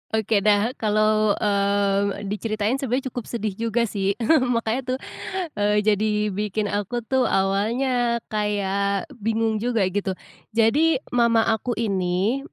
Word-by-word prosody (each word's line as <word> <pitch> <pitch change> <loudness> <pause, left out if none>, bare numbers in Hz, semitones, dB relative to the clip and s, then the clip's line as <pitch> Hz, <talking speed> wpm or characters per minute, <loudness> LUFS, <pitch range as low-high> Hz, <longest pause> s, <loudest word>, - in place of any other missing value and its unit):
Oke 220 -1 +2
dah 210 +3 +3
kalau, 215 -1 +2
eee, 200 -1 +1
diceritain 215 +3 -1
sebenarnya 260 0 -2
cukup 245 -2 -6
sedih 220 -3 -3
juga 230 +1 +1
sih, 200 -3 -1 0.4
makanya 245 +3 -1
tuh, - - -5 0.6
eee, 210 0 +2
jadi 210 0 +1
bikin 205 +1 -2
aku 205 +4 -2
tuh 260 +2 +1
awalnya 235 +5 +1
kayak 200 - -1
bingung 220 0 0
juga 230 -2 0
gitu. 195 -1 -2 0.4
Jadi 280 +9 +4 0.2
mama 235 -2 +3
aku 225 +2 -1
ini, 195 +2 0
215 Hz, 125 wpm, -23 LUFS, 205-235 Hz, 0.6 s, Jadi